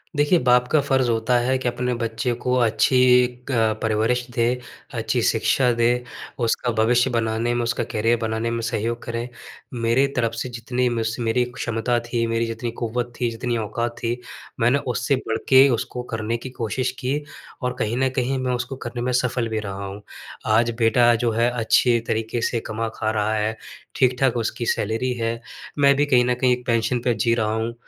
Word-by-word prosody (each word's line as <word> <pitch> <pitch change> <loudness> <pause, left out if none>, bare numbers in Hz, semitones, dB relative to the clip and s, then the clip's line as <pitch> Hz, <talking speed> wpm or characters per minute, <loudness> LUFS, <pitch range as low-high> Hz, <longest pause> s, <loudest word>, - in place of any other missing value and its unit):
देखिए 145 +4 +3
बाप 125 -1 +3
का 155 - +5
फर्ज़ 130 -3 +1
होता 115 +2 +2
है 130 +2 +1
कि 130 -1 -3
अपने 125 +1 -1
बच्चे 115 +2 -1
को 125 - +1
अच्छी 115 +1 +2 0.3
एक 125 +2 -6 0.3
परवरिश 110 +3 +1
दे, 115 0 +1 0.5
अच्छी 115 +1 -1
शिक्षा 125 +4 +2
दे। 115 0 +2 0.5
उसका 120 +1 0
भविष्य 120 +3 +3
बनाने 115 0 0
में, 120 0 0
उसका 120 +1 -1
करियर 115 +1 +1
बनाने 110 +1 -1
में 115 0 -2
सहयोग 115 +1 -2
करें। 115 0 -4 0.5
मेरी 120 +3 +2
तरफ 115 -2 0
से 125 +2 -4
जितनी 125 +1 -1
मुझस 115 -1 -1
मेरी 120 +1 +1
क्षमता 120 +1 -1
थी, 120 0 -2
मेरी 115 0 0
जितनी 115 +1 -4
क़ुव्वत 120 +1 -2
थी, 120 -2 +1
जितनी 120 +1 -2
औकात 115 +2 -3
थी, 120 +1 -2 0.4
मैंने 120 +5 +3
उससे 125 +4 +1
बढ़कर 115 -3 -3
के 135 +1 +8
उसको 125 0 -2
करने 110 +1 -1
की 130 +2 -8
कोशिश 125 +1 -2
की 135 +4 -1 0.4
और 125 - 0
कहीं 110 +3 -1
न 130 0 +2
कहीं 130 +1 0
मैं 130 -1 -1
उसको 125 +2 -3
करने 120 0 -4
में 125 - -1
सफल 125 -1 0
भी 110 -1 -1
रहा 100 -1 -5
हूँ। 100 +1 -7 0.5
आज 115 +2 +4
बेटा 120 +1 +4
जो 115 - +2
है 115 +2 +2
अच्छे 120 0 +3
तरीके 115 +2 -1
से 115 0 0
कमा-खा 110 0 -2
रहा 110 0 0
है। 110 +1 -1 0.4
ठीक-ठाक 125 -1 +2
उसकी 115 +1 -2
सैलरी 115 +5 0
है, 115 -1 -2 0.4
मैं 140 -1 +5
भी 145 +2 +2
कहीं 125 -4 +4
न 125 - +2
कहीं 125 0 +3
एक 125 0 -5
पेंशन 115 +1 +1
पे 120 - +2
जी 115 +2 +1
रहा 110 -2 0
हूँ। 115 +1 -2
120 Hz, 190 wpm, -23 LUFS, 115-125 Hz, 0.5 s, के